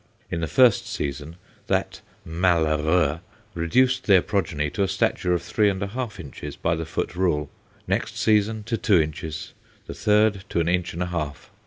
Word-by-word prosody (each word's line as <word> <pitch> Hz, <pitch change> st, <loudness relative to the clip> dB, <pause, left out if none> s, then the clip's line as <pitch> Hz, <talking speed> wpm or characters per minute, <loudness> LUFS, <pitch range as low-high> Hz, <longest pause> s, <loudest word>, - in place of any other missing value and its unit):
In 85 Hz, -, -2 dB
the 80 Hz, -, -1 dB
first 115 Hz, -, +4 dB
season, 75 Hz, +3 st, -4 dB, 0.3 s
that -, -, -1 dB, 0.2 s
malheureux 80 Hz, -2 st, +2 dB, 0.3 s
reduced 125 Hz, +10 st, +2 dB
their 95 Hz, -4 st, +5 dB
progeny 80 Hz, -8 st, -1 dB
to 100 Hz, -, -3 dB
a 100 Hz, -, +3 dB
stature 95 Hz, -1 st, 0 dB
of 90 Hz, -, +1 dB
three 100 Hz, +4 st, +2 dB
and 95 Hz, -1 st, -2 dB
a 100 Hz, -, -3 dB
half 115 Hz, -2 st, -5 dB
inches 75 Hz, -7 st, -8 dB
by 85 Hz, -, 0 dB
the 80 Hz, -1 st, -3 dB
foot 85 Hz, -, -3 dB
rule; 80 Hz, -6 st, 0 dB, 0.4 s
next -, -, -1 dB
season, 110 Hz, 0 st, +2 dB
to 115 Hz, +1 st, -2 dB
two 100 Hz, -6 st, +3 dB
inches; 80 Hz, 0 st, -4 dB, 0.3 s
the -, -, -7 dB
third, 105 Hz, -1 st, +2 dB
to -, -, 0 dB
an 85 Hz, -, +1 dB
inch 90 Hz, 0 st, 0 dB
and 90 Hz, -, -1 dB
a 90 Hz, 0 st, -5 dB
half. 75 Hz, -4 st, -4 dB
90 Hz, 180 wpm, -24 LUFS, 80-105 Hz, 0.4 s, their